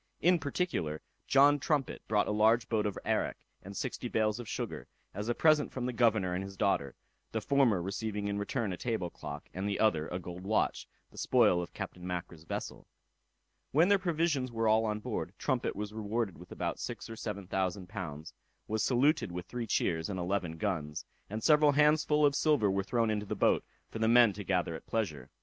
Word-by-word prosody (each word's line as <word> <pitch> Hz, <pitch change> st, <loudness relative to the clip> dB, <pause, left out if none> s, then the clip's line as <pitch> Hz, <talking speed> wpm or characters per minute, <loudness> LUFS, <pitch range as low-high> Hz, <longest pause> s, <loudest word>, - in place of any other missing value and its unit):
In 180 Hz, 0 st, +4 dB
particular, 140 Hz, -, -2 dB, 0.2 s
John 145 Hz, +1 st, +6 dB
Trumpet 140 Hz, -2 st, -1 dB
brought 105 Hz, -1 st, +2 dB
a -, -, 0 dB
large 110 Hz, +2 st, +3 dB
boat 110 Hz, -2 st, +1 dB
of 100 Hz, -, -4 dB
arrack, -, -, 0 dB, 0.2 s
and 100 Hz, +1 st, -9 dB
sixty 125 Hz, -1 st, -3 dB
bales 110 Hz, -1 st, 0 dB
of 120 Hz, -, -7 dB
sugar, -, -, -4 dB, 0.3 s
as 105 Hz, +4 st, -4 dB
a 120 Hz, -, +1 dB
present 155 Hz, -2 st, +4 dB
from 130 Hz, -2 st, -3 dB
the 125 Hz, -, -2 dB
governor 110 Hz, -6 st, +2 dB
and 90 Hz, +2 st, -2 dB
his 95 Hz, 0 st, -9 dB
daughter; 70 Hz, -9 st, 0 dB, 0.4 s
the 110 Hz, -, 0 dB
former 115 Hz, -6 st, +2 dB
receiving 100 Hz, +2 st, -3 dB
in 100 Hz, 0 st, -1 dB
return 105 Hz, -1 st, -2 dB
a -, -, -5 dB
table 110 Hz, -8 st, -2 dB
clock, -, -, -8 dB
and 95 Hz, +2 st, -2 dB
the 100 Hz, -, -2 dB
other 80 Hz, -8 st, +2 dB
a 90 Hz, -, -3 dB
gold 90 Hz, 0 st, -7 dB
watch, 105 Hz, +2 st, 0 dB, 0.2 s
the -, -, -10 dB
spoil 110 Hz, -8 st, +4 dB
of 85 Hz, -, -8 dB
Captain 90 Hz, -, -6 dB
Mackra's 90 Hz, -2 st, -5 dB
vessel. -, -, -5 dB, 0.9 s
When 165 Hz, +7 st, +5 dB
their 200 Hz, -1 st, +5 dB
provisions 160 Hz, -7 st, 0 dB
were 115 Hz, -1 st, 0 dB
all 110 Hz, +1 st, +4 dB
on 105 Hz, -1 st, -2 dB
board, -, -, -4 dB
Trumpet -, -, -1 dB
was 105 Hz, +1 st, -5 dB
rewarded 110 Hz, -2 st, -2 dB
with 90 Hz, -, -14 dB
about -, -, -3 dB
six -, -, -5 dB
or 115 Hz, -, -7 dB
seven 105 Hz, -3 st, -5 dB
thousand 95 Hz, 0 st, -2 dB
pounds, 85 Hz, -6 st, -6 dB, 0.3 s
was 110 Hz, 0 st, 0 dB
saluted 135 Hz, -, +2 dB
with 90 Hz, +1 st, -5 dB
three 120 Hz, +3 st, -5 dB
cheers, 80 Hz, -4 st, 0 dB
and 95 Hz, -2 st, -3 dB
eleven 90 Hz, -2 st, -2 dB
guns; 80 Hz, -7 st, -3 dB, 0.2 s
and 110 Hz, +2 st, -4 dB
several 150 Hz, -1 st, +5 dB
handsfull 150 Hz, +1 st, +4 dB
of 140 Hz, -, +4 dB
silver 140 Hz, -9 st, +3 dB
were 95 Hz, 0 st, +1 dB
thrown 115 Hz, +3 st, +1 dB
into 105 Hz, -1 st, -2 dB
the -, -, -2 dB
boat, -, -, +3 dB, 0.3 s
for 115 Hz, -, -5 dB
the 110 Hz, -, +2 dB
men 120 Hz, -2 st, +6 dB
to 100 Hz, +2 st, -6 dB
gather 90 Hz, -3 st, 0 dB
at 80 Hz, -, -9 dB
pleasure. 80 Hz, -, -2 dB
105 Hz, 205 wpm, -31 LUFS, 95-125 Hz, 0.9 s, John